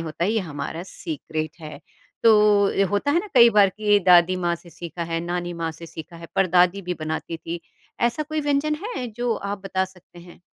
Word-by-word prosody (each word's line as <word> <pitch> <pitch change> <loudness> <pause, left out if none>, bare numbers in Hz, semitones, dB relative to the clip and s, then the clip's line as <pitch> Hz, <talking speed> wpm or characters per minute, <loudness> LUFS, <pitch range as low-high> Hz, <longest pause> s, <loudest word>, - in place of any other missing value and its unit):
होता 165 +1 -3
है, 200 - +1
ये 225 - +1
हमारा 160 -1 -5
सीक्रेट 160 -2 -6
है? 150 -2 -9 0.4
तो 210 -2 +5 0.2
अ, - - +4
होता 205 +8 +1
है 330 - +3
ना, 425 - -8
कई 235 -2 +8
बार 205 -2 +5
की 205 +1 +2
दादी 175 +1 +6
माँ 170 - +2
से 170 0 -14
सीखा 170 +2 -7
है, 165 - 0
नानी 175 +1 -3
माँ 165 - -1
से 170 +1 -11
सीखा 165 +1 -10
है, 170 0 -10
पर-दादी 180 +1 +3
भी 180 0 -3
बनाती 160 +1 -4
थी। 165 +1 -6 0.4
ऐसा 240 +6 +1
कोई 310 +1 -3
व्यंजन 290 +1 +1
है? 435 - -4
जो 240 +2 -2
आप 200 0 -4
बता 190 -1 0
सकते 185 -2 -17
हैं? 175 0 -14
180 Hz, 210 wpm, -23 LUFS, 170-210 Hz, 0.4 s, कई